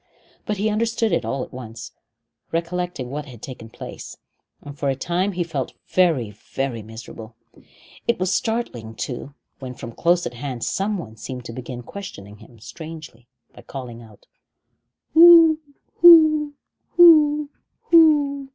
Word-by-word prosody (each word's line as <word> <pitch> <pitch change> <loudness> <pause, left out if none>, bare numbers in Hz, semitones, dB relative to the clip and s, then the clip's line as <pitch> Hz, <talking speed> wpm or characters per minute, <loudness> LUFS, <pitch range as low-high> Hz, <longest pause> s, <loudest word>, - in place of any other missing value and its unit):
But 210 - -2
he 205 +3 0
understood 225 0 0
it 170 - 0
all 135 -1 -2
at - - -12
once, 115 -3 -9 0.6
recollecting 170 -5 -3
what 150 +1 -5
had 120 -4 -12
taken 115 -2 -10
place, - - -10 0.5
and 145 -1 -9
for 140 -2 -2
a 135 - 0
time 175 +8 -1
he 175 0 -1
felt 145 -6 -4 0.2
very, 160 - +2
very 120 +3 -5
miserable. 110 +1 -11 0.7
It 235 - +2
was 185 0 -1
startling, 125 - -3
too, 135 +4 -6 0.2
when 130 -2 -8
from 120 - -8
close 175 +8 +1
at - - -5
hand 125 -1 -6
someone 190 - -3
seemed 125 +1 -8
to 115 - -7
begin 125 0 -8
questioning 105 - -10
him 120 - -17
strangely 145 +1 -11 0.3
by - - -14
calling 125 -4 -9
out: 110 -3 -17 0.9
"Whoo 330 -1 +8 0.4
who 310 -4 +6 0.4
who 300 -4 +6 0.4
who?" 290 -4 +4
155 Hz, 140 wpm, -22 LUFS, -, 0.9 s, Whoo